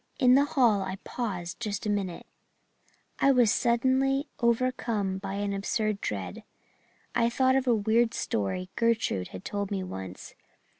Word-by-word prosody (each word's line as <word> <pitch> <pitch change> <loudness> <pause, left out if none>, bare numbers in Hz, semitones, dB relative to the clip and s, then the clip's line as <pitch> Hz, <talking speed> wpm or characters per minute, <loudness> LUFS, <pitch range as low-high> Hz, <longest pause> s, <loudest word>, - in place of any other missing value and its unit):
In 250 -3 +5
the 280 +2 +5
hall 245 -9 +3
I 190 0 -3
paused 185 -7 -4
just 210 -4 -3
a - - 0
minute 195 -4 -3 0.9
I 275 - +5
was 245 -5 +4
suddenly 265 +4 +2
overcome 235 -5 0
by 195 0 -5
an 200 0 -2
absurd 210 +1 -1
dread. 95 -4 -4 0.7
I 235 0 +2
thought 260 +2 +2
of 265 -1 +1
a 240 - +5
weird 225 +2 +2
story 110 - -2
Gertrude 230 - +1
had 95 - -10
told 200 -1 -3
me 195 -2 -2
once. 95 - -8
215 Hz, 150 wpm, -28 LUFS, 190-245 Hz, 0.9 s, In